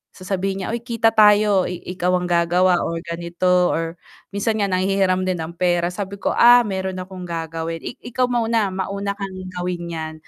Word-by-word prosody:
sasabihin 190 +1 -3
niya, - - -3
"Oy, 235 - -2
kita 230 -1 +1
tayo, 210 -3 +5
ikaw 180 0 -3
ang 180 0 -2
gagawa 175 +1 +3
or 170 - -3
ganito." 175 +1 +1
Or 165 +1 -3 0.3
minsan 205 +3 -1
nga 200 - +1
nanghihiram 185 0 +1
din 185 -1 0
ang 160 - -6
pera, 175 0 +1
sabi 200 +1 -5
ko, - - 0
"Ah, 245 +1 +7
meron 190 -3 -3
akong 185 -1 -8
gagawin, 165 0 -4
i - - -7
ikaw 250 +1 -2
mauna, 230 -4 +1
mauna 200 +2 -3
kang 195 -2 -6 0.2
gawin 175 -1 -4
'yan." 160 -1 -5
185 Hz, 175 wpm, -21 LUFS, 175-200 Hz, 0.3 s, Ah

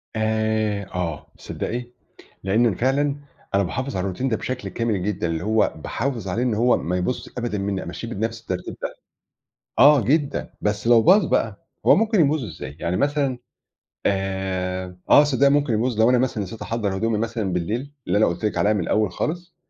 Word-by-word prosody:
آآ، 110 -2 0
آه. 85 -4 -3
تصدّقي، 120 +2 -4 0.6
لإن 105 +5 +3
أنا 110 -6 +2
فعلًا 140 +5 +1 0.4
أنا 100 - +3
باحافظ 130 +9 -3
على 90 - -1
الروتين 100 +7 -2
ده 110 - 0
بشكل 130 0 -4
كامل 110 -6 -1
جدًا، 100 -3 -1
اللي 80 0 -2
هو 110 +2 +2
باحافظ 115 - -3
عليه 105 +7 -1
إن 125 -3 +1
هو 120 +3 +3
ما 90 +2 -2
يبوظ 90 +8 -2
أبدًا 120 -3 -2
منّي، 100 -1 -2
أمشّيه 90 +7 -6
بنَفْس 115 +1 -3
الترتيب 95 -6 -5
ده، - - -4 0.8
آه 145 +1 +8
جدًا. 140 +5 0
بس 105 +1 -1
لو 120 -1 +7
باظ 185 - +6
بقى - - -1 0.2
هو - - +7
ممكن 220 -2 +2
يبوظ 150 -2 +3
إزاي؟ 80 -8 -8
يعني 90 +2 -1
مثلًا 140 -1 +1 0.7
آآ 95 -2 -2
آه، - - +9
تصّدقي 140 -1 +3
ممكن 145 -3 +2
يبوظ 115 +1 0
لو 115 - +5
أنا 125 - +4
مثلًا 120 -4 0
نسيت 105 +4 -9
أحضَّر 110 -4 -2
هدومي 110 +2 0
مثلًا 115 -3 -2
بالليل، 110 +11 -2 0.2
اللي - - +2
أنا 110 - +5
قُلت 85 +5 -2
لك 105 - -1
عليها 105 - +3
من 105 - 0
الأول 105 +3 +1
خالص. 175 - -4
110 Hz, 185 wpm, -23 LUFS, 95-130 Hz, 0.8 s, آه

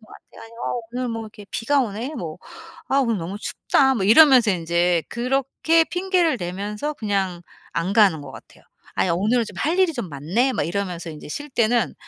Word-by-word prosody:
것 - - -17
같아. 230 +1 -9
어 245 - -2
오늘 250 0 -2
뭐 225 -1 -4
이렇게 215 -1 -11
비가 280 +5 +1
오네.' 235 +5 -3
뭐 160 -8 -6 0.5
'아 275 - +2
오늘 230 -6 +1
너무 175 +4 -5
춥다.' 265 +4 +1
뭐 205 -6 -1
이러면서 250 0 +7
인제 170 -1 +1
그렇게 270 +6 +1
핑계를 355 -4 0
대면서 205 +10 -4
그냥 195 -7 -2 0.3
안 175 +4 -1
가는 200 -8 +4
것 140 -2 -10
같아요. - - -15 0.3
'아 185 - +1
오늘은 215 +8 +1
좀 - - -11
할 325 +5 0
일이 370 -3 +3
좀 240 -9 -5
많네.' 170 - 0
막 - - 0
이러면서 175 -1 -3
이제 150 -1 -10
쉴 290 - -6
때는 235 -1 +1
225 Hz, 340 characters per minute, -22 LUFS, 180-265 Hz, 0.5 s, 이러면서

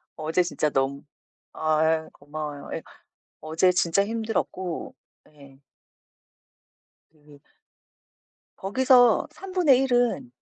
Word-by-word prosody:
어제 160 +3 0
진짜 155 -3 -1
너무 135 0 -1 0.5
아 155 0 0
예. 160 0 0
고마워요. 145 0 -7
예. - - -5 0.6
어제 160 +4 +2
진짜 180 +2 +1
힘들었고 215 -5 -3 0.4
예. 140 -2 -18 1.5
그 150 -2 -20 1.2
거기서 245 +3 +4
1/3 305 -8 +2
은 245 +1 +1
170 Hz, 155 characters per minute, -25 LUFS, 150-240 Hz, 1.5 s, 거기서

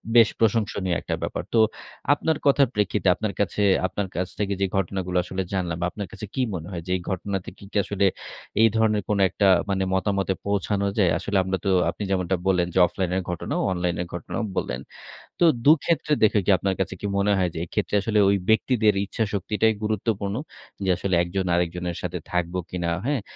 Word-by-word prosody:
বেশ 115 -2 +8
প্রশংসনীয় 105 -5 +1
একটা - - -2
ব্যাপার। - - -3
তো 115 - +4 0.5
আপনার 155 +1 0
কথার 140 -1 +5
প্রেক্ষিতে 105 -2 0
আপনার 105 -2 -3
কাছে 100 +1 0 0.3
আপনার 100 0 -3
কাছ 90 +1 -1
থেকে 100 -1 0
যে, 95 - +4
ঘটনাগুলো 95 -1 -1
আসলে 95 +1 -4
জানলাম 85 -3 -2
আপনার 100 0 -6
কাছে 105 -1 -7
কি 130 - 0
মনে 85 -1 -5
হয় 85 -2 -4
যে, - - -3
এই 90 - -8
ঘটনা 95 +1 -2 0.2
কি 100 - -13 0.2
আসলে 100 0 0 0.6
এই 115 - +8
ধরনের 110 -2 +2
কোনো 100 -1 +2
একটা 100 - +2 0.5
মতামতে 100 -1 0
পৌঁছানো 100 0 0
যায়। 95 -5 +4
আসলে 100 -1 -1
আমরা 95 0 -1
তো - - +2 0.2
আপনি - - -5
যেমনটা 95 0 +1
বললেন 90 -2 +2
যে, 95 - +2
অফলাইন 95 -2 -3
এর - - 0
ঘটনাও 90 - -2
অনলাইনের 90 -1 -1
ঘটনাও 90 +7 -4 0.2
বললেন। 60 +2 -2 0.6
তো 175 - +5 0.2
দুক্ষেত্রে 155 0 +3
দেখে 105 0 +5 0.2
আপনার 95 +2 -1
কাছে 95 0 -1
কি - - -4
মনে 100 +1 +2
হয় 90 -2 +1
যে, - - -7
এক্ষেত্রে 105 +3 -2
আসলে 105 +1 +1
ওই 100 - +3
ব্যক্তিদের 110 -1 +3
ইচ্ছাশক্তিটাই 105 +1 0
গুরুত্বপূর্ণ। 105 -1 -1 0.5
যে, - - +1
আসলে 95 0 0
১ - - -5
জন 95 -1 +1
আরেকজনের 90 0 -2
সাথে - - -3
থাকবো 90 +1 -1
কিনা, 85 -2 -2 0.2
হ্যাঁ, 140 -4 0
100 Hz, 180 wpm, -24 LUFS, 90-105 Hz, 0.6 s, বেশ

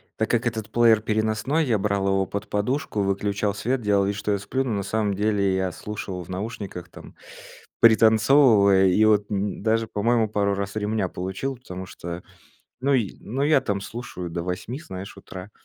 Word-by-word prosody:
Так 110 - -1
как 120 0 +1
этот 110 -2 -3
плеер 115 -2 +5
переносной, 110 +8 0
я 115 -4 +2
брал 100 -1 0
его 95 0 +2
под 100 +3 -5
подушку, 105 +1 -1
выключал 100 +1 0
свет, 125 +4 -1
делал 100 -2 +2
вид, 100 0 -1
что 105 +1 -2
я 100 - +2
сплю, 130 +7 -2
но 125 - -3
на 100 - -2
самом 105 0 -1
деле 100 -1 +1
я 95 -2 -1
слушал 95 -4 -6
в 85 - -17
наушниках, 95 -2 -6
там, - - -14 0.7
пританцовывая, 110 -3 +6
и 100 +4 +3
вот 105 -1 +3
н 100 -1 -2
даже, 115 +1 +1
по-моему, 110 +1 +1
пару 100 -1 0
раз 100 +2 -4
ремня 105 -3 -1
получил, 95 +9 -4
потому 95 -6 -8
что 85 0 -7 0.6
ну 140 +2 +1
й, 110 -7 0
ну 130 +6 -3
я 145 -2 +4
там 100 -1 -2
слушаю 100 -6 -7
до 85 +1 -4
8, 95 +9 -4
знаешь, 95 - -8
утра, 95 +2 -10
105 Hz, 185 wpm, -24 LUFS, 95-115 Hz, 0.7 s, пританцовывая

